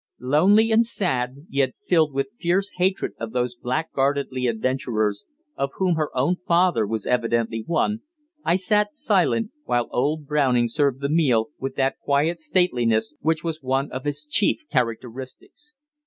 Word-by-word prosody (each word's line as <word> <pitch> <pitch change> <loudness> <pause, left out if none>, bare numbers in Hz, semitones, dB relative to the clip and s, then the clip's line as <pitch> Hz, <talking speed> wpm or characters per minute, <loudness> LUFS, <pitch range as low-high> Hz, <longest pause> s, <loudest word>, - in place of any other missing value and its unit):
Lonely 190 - +4
and 225 +1 +5
sad, 140 - -2
yet 135 -2 0
filled 160 -4 +3
with 135 +8 -2
fierce 195 +3 0
hatred 185 +2 0
of 115 -1 -5
those 125 -1 -1
blackguardly 135 -1 -1
adventurers, 110 -3 -1 0.3
of 140 0 -2
whom 185 -2 +1
her 155 -2 -1
own 145 +8 +2
father 170 - +3
was 110 -1 -3
evidently 115 -2 0
one, 210 +6 0 0.4
I 170 - +2
sat 210 +7 +1
silent, 220 - +1
while 120 -1 0
old 150 +4 0
Browning 135 -5 +2
served 135 +2 0
the 140 - -1
meal 140 -7 +2
with 135 0 -4
that 135 0 0
quiet 150 +5 +1
stateliness 135 -8 +1
which 160 +1 0
was 160 -2 -4
one 135 +1 -1
of 130 +2 -6
his 145 +1 -2
chief 205 - +1
characteristics. 130 - -4
140 Hz, 150 wpm, -23 LUFS, 125-175 Hz, 0.4 s, and